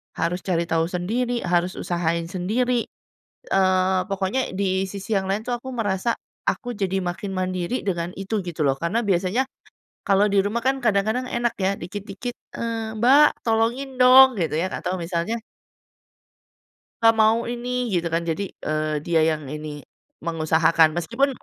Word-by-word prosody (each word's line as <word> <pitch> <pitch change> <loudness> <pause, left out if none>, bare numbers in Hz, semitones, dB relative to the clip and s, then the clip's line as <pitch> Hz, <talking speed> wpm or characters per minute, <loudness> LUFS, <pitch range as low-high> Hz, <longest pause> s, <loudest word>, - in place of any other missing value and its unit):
Harus 170 +2 -1
cari 170 -2 +1
tahu 165 0 0
sendiri, 230 +8 -2
harus 175 +1 +1
usahain 170 -1 -1
sendiri, 230 +6 0 0.7
eee, 185 -1 +3
pokoknya 195 +7 -1
di 190 0 0
sisi 200 +2 -4
yang 190 -1 0
lain 210 +3 -2
tuh 245 - 0
aku 260 - -6
merasa, 225 -1 -1 0.3
aku 245 -2 -5
jadi 195 -2 -1
makin 190 +3 -4
mandiri 185 +5 -2
dengan 175 -2 -1
itu 195 +1 -2
gitu 165 -4 -2
loh, 135 - +3
karena 180 +7 0
biasanya 195 +7 +1 0.6
kalau 200 +1 +4
di 200 - +4
rumah 210 +5 0
kan 270 +1 +1
kadang-kadang 220 +2 +1
enak 240 -1 -1
ya 195 +1 +1
dikit-dikit, 200 +6 -6 0.2
eee, 225 -1 -3
"Mbak 285 +4 +5
tolongin 240 +4 0
dong" 255 -2 +8
gitu 160 -3 0
ya 180 +4 -1
atau 185 - -2
misalnya 170 +5 -2 1.7
"Pa 225 - +7
mau 220 +1 +5
ini," 240 +1 -5 0.2
gitu 170 -1 +1
kan. 165 - +2
Jadi, 165 +5 -1 0.2
eee, 155 0 0
dia 170 -2 +2
yang 155 -1 -3
ini 150 0 -6 0.6
mengusahakan. 160 0 +3
Meskipun 235 - +1
195 Hz, 150 wpm, -23 LUFS, 175-230 Hz, 1.7 s, dong